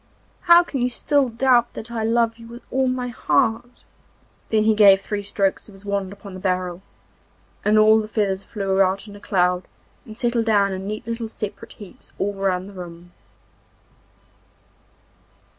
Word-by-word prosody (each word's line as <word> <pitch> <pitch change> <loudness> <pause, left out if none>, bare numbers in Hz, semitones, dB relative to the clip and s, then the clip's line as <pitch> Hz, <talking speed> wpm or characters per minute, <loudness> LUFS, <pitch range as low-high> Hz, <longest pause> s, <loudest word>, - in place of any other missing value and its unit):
'How 345 +1 +9
can 275 -6 -4
you 250 - +1
still 280 +2 +1
doubt 240 0 +2
that 230 +2 -8
I 225 -2 -3
love 230 0 +1
you 230 - -12
with 235 +1 -11
all 265 0 +1
my 255 -1 -2
heart?' 225 +4 -1 0.7
Then 215 -1 +2
he 220 0 +4
gave 200 -2 +6
three 205 +1 -4
strokes 195 -1 -1
of - - -14
his 195 +1 -15
wand 200 -2 -2
upon 200 -1 -11
the 185 - -8
barrel, 185 -1 -2 0.8
and 215 +1 +3
all 215 +1 +6
the 215 - -4
feathers 200 -3 -1
flew 195 -2 -1
out 195 +2 +1
in 205 - -11
a - - -11
cloud 180 -2 0 0.4
and 220 -4 -11
settled 240 -2 0
down 200 -3 +3
in 190 +1 -5
neat 215 +2 -5
little 230 0 -4
separate 220 +1 -7
heaps 205 -4 -15
all 205 +1 -1
round 190 -1 -1
the 200 - -12
room. 175 -1 -10
210 Hz, 175 wpm, -22 LUFS, 195-230 Hz, 0.8 s, How